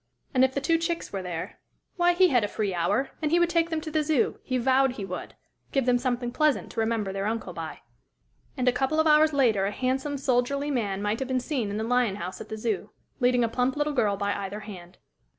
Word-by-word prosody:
And 260 -1 +4
if 265 0 +2
the 280 - 0
two 330 +4 +2
chicks 335 - -3
were 195 - -2
there 175 -3 -6 0.4
why, 350 -1 +3
he 365 +1 +5
had 245 -6 +3
a - - +1
free 205 -2 -2
hour 195 +10 0
and 305 - +1
he 335 - +3
would 345 0 +3
take 335 -1 +2
them 320 -1 -1
to 315 0 -6
the 310 0 +2
Zoo 300 -5 +1
he 255 - -2
vowed 260 +1 +3
he 205 -6 -5
would! 180 -1 -7 0.4
give 270 -3 +1
them 245 -1 +3
something 245 -1 -1
pleasant 300 +2 +1
to - - -5
remember 220 -3 0
their 195 +1 -2
uncle 220 -4 -3
by. 165 -1 -7 0.8
And 255 -1 -1
a - - +7
couple 270 +5 0
of 315 - +4
hours 310 0 +5
later 230 -9 +2
a - - -2
handsome, 265 +5 -1
soldierly 275 +2 0
man 205 -6 -1
might 210 +2 0
have 265 - -3
been 260 -1 0
seen 250 -4 -2
in 205 - -3
the 220 - -2
lion 240 -3 +1
house 185 -2 -6
at - - -9
the 220 - -5
Zoo, 215 -2 -2 0.3
leading 245 -1 +3
a - - +2
plump 250 +3 0
little 295 0 0
girl 210 -7 +1
by 200 0 0
either 200 +1 -5
hand. 185 -4 -10
250 Hz, 245 wpm, -27 LUFS, 205-280 Hz, 0.8 s, a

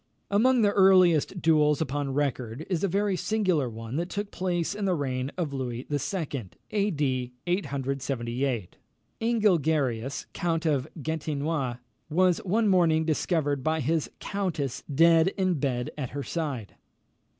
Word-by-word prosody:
Among 235 +4 +4
the 205 - +4
earliest 185 -3 +4
duels 150 -2 +4
upon 140 -2 -2
record, 130 -1 -2
is 175 -1 0
a - - +3
very 200 +1 +1
singular 185 - +1
one 115 +3 -6
that 175 +2 -2
took 205 +1 -4
place 175 -1 -1
in 205 0 -3
the 185 -2 +2
reign 130 -2 -2
of 160 -6 -2
Louis 125 -2 -4
II. 145 - -2 0.2
(A. 205 -1 +1
D. 130 -7 -1
878). 135 - -2 0.4
Ingelgerius 160 - +1
count 165 -1 -1
of 145 -5 +1 0.2
Gastinois 150 -4 -2 0.3
was 180 +2 +3
one 215 +4 +1
morning 165 -4 +3
discovered 150 -3 0
by 160 +2 +1
his 155 +2 0
countess 175 - -2
dead 165 +3 +5
in 185 -5 +1
bed 125 -3 -1
at 135 -5 -4
her 140 +1 -5
side. 140 - -4
155 Hz, 140 wpm, -27 LUFS, 135-180 Hz, 0.4 s, dead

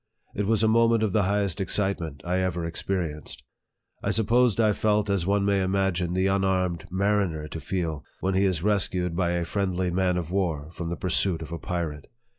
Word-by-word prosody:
It 100 -1 -2
was 110 -1 +2
a - - +5
moment 115 0 +4
of 105 - +1
the 105 - +3
highest 100 -1 0
excitement 95 -6 -1
I 90 +1 0
ever 90 -2 -1
expe 85 +2 -5
rienced. 75 -4 -5 0.6
I - - -1
suppose 115 +1 +3
I 110 -2 +4
felt 105 0 +1
as 95 -3 0
one 100 0 +2
may 100 -1 +2
imagine 95 -2 0
the 95 +1 +2
un 95 0 +1
armed 90 -3 0
mariner 95 -5 0
to 80 - -6
feel 80 -5 -3 0.2
when 95 +1 0
he 95 +1 +3
is 90 -4 0
rescued 95 -4 +1
by 85 -1 +1
a 85 -1 -1
friendly 95 -1 -1
man 90 0 +1
of 85 -1 -4
war 80 -6 -1
from 85 0 -5
the 85 - -3
pursuit 90 -2 0
of 80 - -10
a 85 - -4
pirate. 80 -5 -4
95 Hz, 205 wpm, -26 LUFS, 85-100 Hz, 0.6 s, a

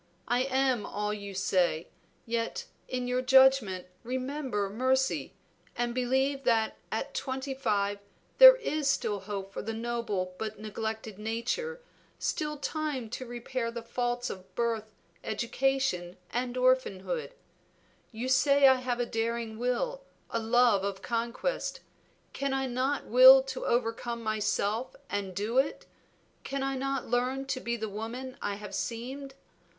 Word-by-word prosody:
I 245 +2 +2
am 260 -4 +1
all 210 0 -2
you 200 -2 -7
say, 180 -4 +1 0.4
yet 230 0 -2 0.2
in 250 -1 -2
your 250 0 +1
judgment 260 -8 +5 0.2
remember 255 -3 -2
mercy, 260 +5 0 0.4
and 240 0 -1
believe 265 +2 +1
that 225 -3 +2 0.2
at 270 +6 -3
twenty 265 +1 -3
five 205 -6 0 0.4
there - - +12
is 310 - -1
still 210 -6 0
hope 195 0 -6
for - - -4
the 225 +1 -4
noble 225 -6 -2
but 215 -1 -4
neglected 220 -1 -5
nature, 245 - -2 0.4
still 300 -1 -2
time 285 -6 -3
to 255 - -5
repair 240 0 -3
the 235 0 -6
faults 245 +1 -2
of 185 -1 -11
birth, 230 -2 0 0.4
education, 230 -5 0
and 245 +1 -2
orphanhood. 255 - +1 0.8
You 235 +2 -4
say, 280 +1 +5
I 260 -1 +6
have 250 -1 -2
a 245 - +1
daring 225 -1 -2
will, 485 - -1 0.3
a 230 - 0
love 230 -3 +4
of 195 -1 -3
conquest. 235 - -2 0.5
Can 275 -1 -1
I 270 0 0
not 260 +3 -1
will - - +9
to - - -5
overcome 235 0 -1
myself 215 +2 -1 0.2
and 195 -2 -3
do 220 +6 +1
it? 275 - -1 0.6
Can 275 0 -3
I 270 0 -1
not 275 0 -2
learn 250 +3 0
to 270 -1 -2
be 235 -1 -2
the 220 -1 -3
woman 230 +5 -6
I 205 - -2
have 205 -1 -9
seemed? 255 +7 -4
240 Hz, 140 wpm, -29 LUFS, 220-265 Hz, 0.8 s, there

